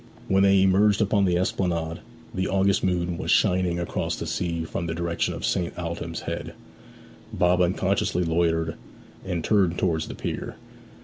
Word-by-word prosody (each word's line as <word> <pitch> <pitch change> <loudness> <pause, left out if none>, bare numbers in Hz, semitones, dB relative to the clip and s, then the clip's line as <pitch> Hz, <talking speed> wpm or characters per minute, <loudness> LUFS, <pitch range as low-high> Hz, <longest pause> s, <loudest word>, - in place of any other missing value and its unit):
When 95 0 +3
they 100 -1 +5
emerged 100 +2 +4
upon 100 -2 +2
the 90 -2 +2
esplanade, 85 -3 -1 0.3
the 95 0 -1
August 95 0 +2
moon 90 -2 0
was - - -4
shining 90 -3 +2
across 85 - -2
the - - -5
sea 85 -2 -2
from 85 +1 -4
the 80 - -3
direction 85 0 -1
of - - -4
St. 85 -2 -1
Aldhelm's 85 -1 -4
Head. - - -5 0.8
Bob 90 0 +2
unconsciously 90 0 +1
loitered, 80 -1 0 0.5
and 90 -3 -3
turned 95 -4 +2
towards 80 -3 0
the - - -7
pier. - - -5
90 Hz, 160 wpm, -25 LUFS, 85-95 Hz, 0.8 s, they